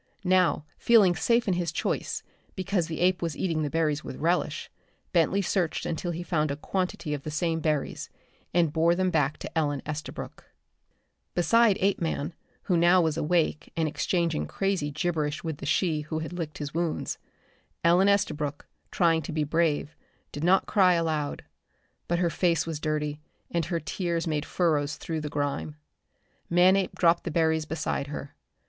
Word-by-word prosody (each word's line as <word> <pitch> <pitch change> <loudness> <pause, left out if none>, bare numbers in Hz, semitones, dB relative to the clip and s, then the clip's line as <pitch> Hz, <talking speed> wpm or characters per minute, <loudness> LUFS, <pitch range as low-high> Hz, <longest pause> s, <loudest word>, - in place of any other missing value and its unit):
Now, 180 -4 +3
feeling 205 -7 +5
safe 235 +7 +2
in 190 - +3
his 175 -2 -1
choice, - - -2 0.3
because 190 -3 -1
the 160 -1 -4
ape 180 0 +3
was 165 -4 -2
eating 165 -4 0
the 150 - -1
berries 155 -1 0
with - - -6
relish, 170 +5 -1 0.4
Bentley 180 +3 +3
searched 175 -3 0
until 170 +2 -2
he 175 +1 -3
found 155 -4 0
a 140 - -1
quantity 180 -1 -2
of 145 - -3
the 155 - -6
same 165 +1 0
berries, 155 -3 -2 0.4
and 165 -3 +2
bore 170 +1 +3
them 185 0 +1
back 150 -3 +1
to - - -8
Ellen 145 -4 0
Estabrook. 150 0 -6 0.9
Beside 210 +4 +4
Apeman, 170 -5 0 0.3
who 180 - +1
now 175 +2 +5
was 160 -3 +2
awake 165 -1 0
and 160 -1 +2
exchanging 165 +1 0
crazy 195 -6 -1
gibberish 155 -1 -2
with 160 -3 -3
the 140 - -6
she 155 0 +1
who 155 +1 -4
had 160 +2 -4
licked 165 -4 -5
his 145 -1 -5
wounds, 165 -1 -2 0.6
Ellen 175 +4 +5
Estabrook, 150 -8 0 0.2
trying 165 -2 +2
to 160 - -6
be 155 -1 0
brave, 155 0 0 0.4
did 145 - -5
not 185 +3 +4
cry 185 -3 +4
aloud. 155 -3 -1 0.6
But 175 - +1
her 170 -1 +1
face 165 -4 +1
was 160 -2 -4
dirty, 150 -1 -2 0.3
and 170 -2 0
her 170 +1 -1
tears 170 +2 -2
made 155 -2 -1
furrows 150 -5 +1
through 160 -2 -4
the 150 - -4
grime. 140 - -2 0.7
Manape 185 +2 +4
dropped 170 -1 +3
the - - -3
berries 160 -1 +1
beside 155 -2 -2
her. 145 0 -7
165 Hz, 165 wpm, -27 LUFS, 150-175 Hz, 0.9 s, feeling